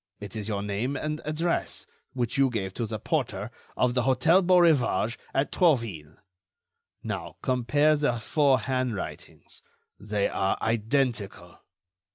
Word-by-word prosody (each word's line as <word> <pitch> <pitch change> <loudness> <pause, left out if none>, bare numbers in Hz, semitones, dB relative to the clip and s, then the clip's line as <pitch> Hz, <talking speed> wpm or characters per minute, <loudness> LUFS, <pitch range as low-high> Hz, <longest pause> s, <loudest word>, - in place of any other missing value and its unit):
it 105 0 -9
is 105 -1 -4
your 100 -2 -2
name 105 +7 -2
and 155 +1 -3
address, 165 +3 -2 0.3
which 125 -2 -2
you 135 -1 +4
gave 95 -6 -3
to 115 +1 -3
the 110 0 -4
porter 110 - -2 0.3
of 125 -1 +2
the 125 - +1
Hôtel 135 +9 +3
Beaurivage 160 - +3 0.2
at 135 +1 0
Trouville. 115 - +1 0.9
Now, - - -5
compare 145 +5 +2
the 145 -6 0
four 135 +1 +2
handwritings. 130 -4 -4 0.4
They 105 -1 -1
are 95 - 0
identical." 110 -6 -1
125 Hz, 130 wpm, -27 LUFS, 105-145 Hz, 0.9 s, you